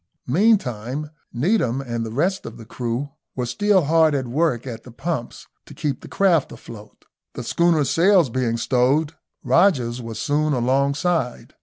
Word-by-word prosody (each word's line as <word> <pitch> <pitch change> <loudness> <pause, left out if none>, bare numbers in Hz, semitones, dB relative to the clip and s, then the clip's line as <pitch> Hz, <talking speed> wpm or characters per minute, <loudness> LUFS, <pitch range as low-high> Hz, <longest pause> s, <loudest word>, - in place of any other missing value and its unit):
Meantime 145 - +1 0.2
Needham 130 - +1
and 120 -4 -3
the 115 - -5
rest 180 - -1
of - - -9
the 115 - -11
crew 125 +4 -4 0.2
were 125 - -2
still 190 +9 +2
hard 160 0 +3
at 135 -2 -1
work 130 -1 0
at 115 -3 -6
the - - -12
pumps, 135 0 -5 0.2
to - - -12
keep 145 -4 -3
the - - -11
craft 180 -7 +2
afloat. 105 -2 -12 0.3
The - - -5
schooner's 170 -5 +2
sails 175 - +4
being 120 -2 -1
stowed, 135 +6 +1 0.3
Rogers 130 -10 +2
was 115 -2 -7
soon 145 +6 0
alongside. 140 +3 0
140 Hz, 155 wpm, -22 LUFS, 120-165 Hz, 0.3 s, sails